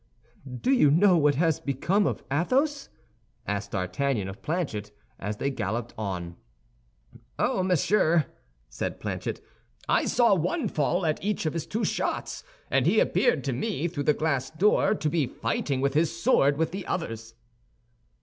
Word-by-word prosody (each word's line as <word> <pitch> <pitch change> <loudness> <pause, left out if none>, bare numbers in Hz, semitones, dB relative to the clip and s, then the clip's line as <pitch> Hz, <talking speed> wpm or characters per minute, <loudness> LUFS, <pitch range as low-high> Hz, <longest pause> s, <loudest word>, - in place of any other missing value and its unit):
"Do 260 - +1
you 245 - +5
know 180 +5 +5
what 150 -3 +3
has 160 +1 +2
become 175 +9 +1
of - - -3
Athos?" 270 - +1 0.6
asked 100 0 -3
D'Artagnan 100 +3 -1
of 95 +1 -9
Planchet, 140 - -3 0.3
as 105 +1 -4
they 140 - -1
galloped 115 -1 -3
on. 90 -5 -5 1.0
"Ah, - - +1
monsieur," 175 -3 +3 0.4
said - - -4
Planchet, - - -4 0.5
"I - - +2
saw 235 -3 +4
one 195 - 0
fall 170 +4 0
at 155 +1 -1
each 205 -4 -1
of 155 - 0
his 165 -2 -4
two 225 +3 -1
shots, - - -2 0.3
and - - +3
he - - +4
appeared 485 - +2
to - - -1
me, 200 -8 -2
through 145 -5 -4
the 150 - +3
glass 140 -5 -1
door, 205 +5 +3
to 155 - -2
be 150 -3 +1
fighting 130 +4 -2
with 140 0 +1
his 155 +2 +3
sword 170 - +2
with 160 +1 0
the 195 +1 -6
others." 115 -9 -4
155 Hz, 160 wpm, -27 LUFS, 125-185 Hz, 1.0 s, you